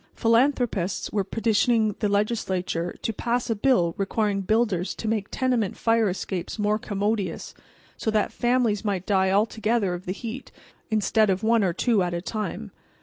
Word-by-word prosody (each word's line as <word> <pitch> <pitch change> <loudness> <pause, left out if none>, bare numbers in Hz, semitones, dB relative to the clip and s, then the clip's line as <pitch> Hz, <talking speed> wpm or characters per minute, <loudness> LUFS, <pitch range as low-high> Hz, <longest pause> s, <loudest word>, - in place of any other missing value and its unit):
Philanthropists 230 -5 +1
were 205 -2 0
petitioning 220 +1 +1
the 210 - +1
Legislature 190 -5 -1
to 225 - -1
pass 235 +2 -1
a - - +1
bill 200 -7 +2
requiring 200 0 0
builders 195 -3 0
to 225 - -5
make 215 -2 -1
tenement 250 -7 0
fire 225 -2 +2
escapes 185 0 -4
more 210 0 +1
commodious, 205 -2 -2 0.4
so - - -2
that 215 -1 +1
families 240 -4 +1
might 195 -4 -2
die 190 -2 +2
all 200 +3 +4
together 220 -3 0
of 175 +1 -7
the - - -1
heat 235 +5 -7 0.4
instead 215 0 +2
of 190 +1 0
one 225 -1 +3
or 185 - +2
two 220 +4 +1
at 175 -1 -1
a - - -1
time. 195 - -4
210 Hz, 165 wpm, -25 LUFS, 190-230 Hz, 0.4 s, all